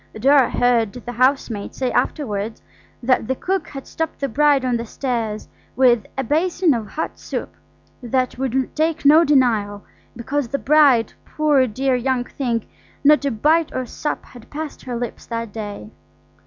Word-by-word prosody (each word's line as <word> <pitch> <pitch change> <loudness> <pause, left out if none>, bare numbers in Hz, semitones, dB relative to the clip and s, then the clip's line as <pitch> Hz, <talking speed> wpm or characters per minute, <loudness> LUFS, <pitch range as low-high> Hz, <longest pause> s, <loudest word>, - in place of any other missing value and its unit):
Dora 275 +2 +5
heard 235 -4 +2
the 245 -1 -7
housemaid 245 -4 0
say 255 -2 -1
afterwards 220 -6 -2 0.4
that 250 -2 +2
the 260 - 0
cook 380 +7 -2
had 275 -2 -8
stopped 320 -1 -4
the 275 - -1
bride 280 +1 +3
on 250 -1 +1
the 230 - -5
stairs 230 -4 -3 0.3
with 240 -4 +3
"a 265 - 0
basin 330 +4 +2
of 225 -4 -3
hot 315 +9 -5
soup, - - -5 0.5
that 255 +1 -1
would 265 0 -1
take 320 0 0
no 310 +4 +7
denial, 225 -9 +2 0.3
because 255 +3 -2
the 275 - -2
bride, 275 -6 +4
poor 295 -4 +2
dear 260 +4 0
young 250 0 0
thing, 240 -4 -3 0.4
not 300 +1 +5
a - - +2
bite 305 +7 +2
or 255 - -2
sup 295 +5 -4
had 245 -3 -15
passed 305 0 -6
her 250 -2 -4
lip 240 0 -4
that 230 -3 -4
day". 205 - -7
255 Hz, 165 wpm, -21 LUFS, 230-290 Hz, 0.5 s, no